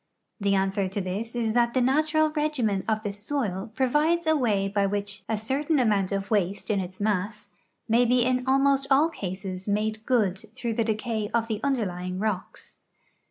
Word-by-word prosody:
The 200 -1 +2
answer 195 0 +1
to 195 +2 -4
this 200 +5 -4
is 225 -2 0
that 235 0 +2
the - - +4
natural 310 +4 +2
regimen 290 - 0
of 220 -1 0
the 205 -2 -3
soil 210 -3 -3
provides 300 +7 +2
a 315 0 +3
way 210 -8 +1
by 200 0 +1
which 205 0 -3
a 220 - +1
certain 280 +8 0
amount 210 -7 +2
of 195 +1 -3
waste 200 +1 0
in 200 - +1
its 185 0 -6
mass 210 0 -2 0.4
may 235 +2 +4
be 245 0 +3
in 255 0 +1
almost 275 0 +3
all 285 +4 +5
cases 190 - -6
made 215 +1 -1
good 210 -7 +2 0.2
through 235 -2 -2
the 230 - +1
decay 220 -1 -2
of 230 -1 +1
the 220 -2 -2
underlying 185 -9 -1
rocks. 205 -2 -4
220 Hz, 180 wpm, -26 LUFS, 200-255 Hz, 0.4 s, all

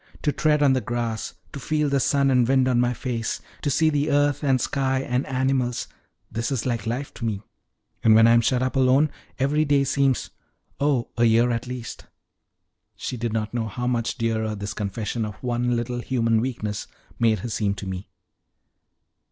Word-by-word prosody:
To 150 - +2
tread 150 0 +2
on 135 -2 +5
the 130 - +1
grass, 120 -2 -3 0.2
to 140 - -5
feel 150 +2 0
the 140 -1 +2
sun 140 +1 +2
and 125 -2 +4
wind 130 0 +3
on 125 -2 +2
my 125 0 +2
face, 120 -2 -3 0.2
to 145 - 0
see 155 +3 +3
the 145 0 0
earth 145 0 +2
and 135 -2 +3
sky 130 +1 0
and 125 0 -1
animals 130 -2 0 0.4
this 115 +4 -2
is 130 -5 -1
like 120 -4 -2
life 130 +5 -3
to - - -9
me; 105 -2 -2 0.6
and 110 -1 +6
when 115 0 +7
I 115 - +6
am 115 0 +6
shut 125 +2 +1
up 130 - -2
alone, 135 +3 +4 0.3
every 145 +3 +2
day 145 -2 +3
seems 135 -1 +1 0.5
oh, 140 -4 +1
a 120 - +4
year 115 +2 +4
at 115 +1 -2
least!" 125 -2 -7 0.9
She - - -4
did 120 -1 -2
not 110 0 -2
know 115 -2 -1
how 125 +4 -4
much 120 -1 -1
dearer 110 -2 -1
this 100 0 -5
confession 105 +3 -3
of 105 -2 -5
one 120 0 0
little 120 +1 -2
human 115 -3 +1
weakness 110 -5 -3 0.3
made 110 -4 +2
her - - -3
seem 105 -2 0
to 100 - -7
me. 95 0 -6
125 Hz, 195 wpm, -24 LUFS, 115-135 Hz, 0.9 s, when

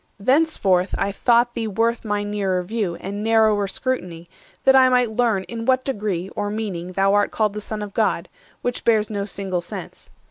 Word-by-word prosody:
Thenceforth 200 - +2
I 200 0 0
thought 240 +3 +2
thee 230 -2 -3
worth 230 +3 0
my 205 -1 -1
nearer 195 -3 -1
view 200 -3 -2
And 200 +4 -6
narrower 220 -2 +3
scrutiny, 180 -8 -3 0.4
that 265 - +6
I 260 -1 +7
might 250 -2 +2
learn 220 -4 +1
In 230 +3 -6
what 260 0 +2
degree 205 -8 -2
or 205 0 -3
meaning 190 -5 -4
thou 195 +1 +2
art 205 0 +3
called 215 -2 0
The 210 - -5
Son 210 0 -4
of 205 -1 -8
God, - - 0 0.4
which 245 0 -2
bears 220 -2 +2
no 200 -1 -2
single 190 -2 -2
sense. 170 - -9
210 Hz, 185 wpm, -22 LUFS, 195-230 Hz, 0.4 s, I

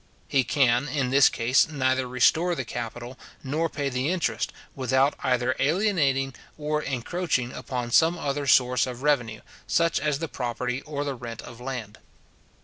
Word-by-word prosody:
He 135 -2 +2
can, 125 0 +2
in 140 -4 -1
this 135 0 +6
case, 125 +6 +2
neither 130 -3 0
restore 160 +8 +3
the 130 - -4
capital 120 +2 -6 0.2
nor 155 +5 -1
pay 145 -2 -3
the 130 +2 -1
interest, 165 -11 -1 0.2
without 130 +2 +2
either 125 0 +1
alienating 145 -9 +1 0.2
or 150 0 -1
encroaching 135 -1 -2
upon 125 -2 -4
some 160 +7 +4
other 145 -2 -2
source 125 -2 +4
of 125 +1 -7
revenue, 120 -8 +1 0.3
such 170 -1 +2
as 150 0 0
the 165 +2 -4
property 125 0 -3
or 145 -1 -3
the 140 -1 -2
rent 115 -3 -8
of 120 0 -11
land. 125 -5 -6
130 Hz, 155 wpm, -26 LUFS, 125-150 Hz, 0.3 s, this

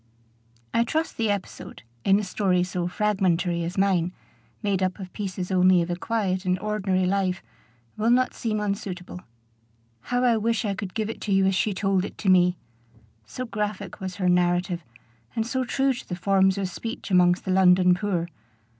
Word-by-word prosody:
I 230 - +3
trust 315 +7 -2
the 225 -2 0
episode, 200 - -5 0.2
in 195 +1 +4
a - - -2
story 185 -2 +1
so 180 -1 -2
fragmentary 180 -3 0
as 170 +3 -5
mine, 185 -3 +2 0.5
made 200 -2 0
up 185 -1 0
of 185 -3 -9
pieces 190 -2 -4
only 185 -1 +5
of 170 - -4
a - - 0
quiet 190 -2 -1
and 185 -1 +1
ordinary 190 -2 0
life, 185 -1 0 0.5
will 215 +2 +1
not 255 +1 +3
seem 215 -2 -2
unsuitable. 195 -3 -4 0.8
How 245 0 0
I 240 -2 +4
wish 225 0 0
I 200 - 0
could 195 0 -6
give 220 -1 -1
it 225 - -9
you 195 -1 +3
as 195 - +2
she 195 +2 0
told 195 -1 +1
it - - -7
to 195 - -1
me! 180 -1 +4 0.7
so 255 - -5
graphic 210 -4 -4
was 185 -1 -4
her 185 -3 -1
narrative, 175 0 +1 0.5
and 225 - 0
so 260 +2 -1
true 270 +2 +1
to 240 - -10
the 180 - -2
forms 190 +1 +2
of 195 -1 -1
speech 225 +4 -6
amongst 180 -1 +4
the 190 - -1
London 180 -1 +5
poor. 180 -2 -1
190 Hz, 180 wpm, -25 LUFS, 180-210 Hz, 0.8 s, only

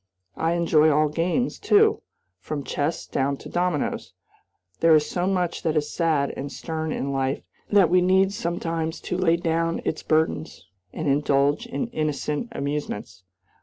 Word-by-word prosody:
I 165 +1 0
enjoy 160 -2 +4
all 150 0 +3
games, 175 +11 -1
too, 430 +1 +4 0.4
from 145 -2 -5
chess 145 +5 -2
down 140 +1 -1
to - - -11
dominoes. 175 -4 -1 0.7
There 165 -1 +6
is 150 -1 +3
so 180 0 -1
much 180 -3 0
that 160 -2 0
is 150 0 -1
sad 155 -5 +1
and 140 +1 -5
stern 160 0 -4
in 140 -1 -2
life 135 0 -1 0.3
that 195 -5 +4
we 180 0 +5
need 190 +2 +3
sometimes 165 -2 -3
to - - -3
lay 175 -2 +3
down 165 -1 0
its 155 - -2
burdens 155 0 -1 0.3
and 160 - -4
indulge 145 - +2
in 240 - -2
innocent 150 +1 -2
amusements. 140 - -4
160 Hz, 155 wpm, -24 LUFS, 150-175 Hz, 0.7 s, There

